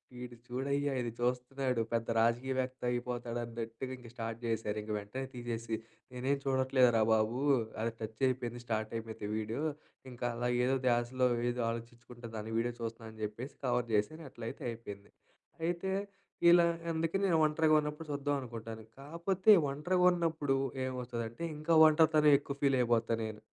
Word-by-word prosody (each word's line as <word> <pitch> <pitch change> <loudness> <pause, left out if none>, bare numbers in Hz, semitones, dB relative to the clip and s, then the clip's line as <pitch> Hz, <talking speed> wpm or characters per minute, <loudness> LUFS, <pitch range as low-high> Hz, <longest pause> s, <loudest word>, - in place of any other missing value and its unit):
"వీడు 125 0 -8
చూడయ్యా 140 +3 -1
ఇది 120 -1 -3
చూస్తున్నాడు, 125 0 0
పెద్ద 115 0 0
రాజకీయ 120 +4 +2
వేత్త 130 0 -3
అయిపోతాడు" 120 -1 -3
అన్నట్టుగా 115 +2 -6
ఇంక 120 -2 -12
స్టార్ట్ 115 -1 -4
చేశారు. 110 -2 -1
ఇంక 105 - -6
వెంటనే 105 +7 -5
తీసేసి, 115 -2 -3 0.4
నేనేం 130 +3 0
చూడట్లేదురా 130 -3 +3
బాబు, 110 +3 +1 0.4
అది 115 - 0
టచ్ 110 0 -6
అయిపోయింది, 120 -2 -2
స్టార్ట్ 110 -1 -2
అయిపోతే 110 -2 -6
వీడియో 110 +5 -3 0.5
ఇంకా 120 0 -5
అలా 120 +1 -1 0.2
ఏదో 130 +2 +2
ద్యాశ‌లో 120 +1 +2 0.2
ఏదో 120 0 -2
ఆలోచించుకుంట 120 +1 -8
దాని 110 +1 -5
వీడియో 120 +1 0
చూస్తున్నాను 115 0 -5
అని 110 -1 -7
చెప్పేసి 120 +6 -6
కవర్ 120 -1 +1
చేశాను. 130 +11 0
అట్లయితే 115 -1 -7
అయిపోయింది. 105 -3 -9 0.5
అయితే, 175 +2 -1 0.6
ఇలా 170 0 +7 0.3
అందుకని 165 +5 0
నేను 170 -3 +3
ఒంటరిగా 155 0 +3
ఉన్నప్పుడు 150 +2 -5
చూద్దాం 145 0 0
అనుకుంటాను. 115 -2 -7 0.2
కాపోతే 170 +8 +2 0.2
ఒంటరిగా 175 +6 +1
ఉన్నప్పుడు 160 -5 0 0.3
ఏమవుతదంటే, 125 +1 -4
ఇంకా 155 +2 0
ఒంటరితనం 155 -1 +5
ఎక్కువ 140 -1 -6
ఫీల్ 135 -2 +4
అయిపోతా 115 -1 +2
నేను. 110 -1 -6
125 Hz, 145 wpm, -33 LUFS, 115-140 Hz, 0.6 s, ఇలా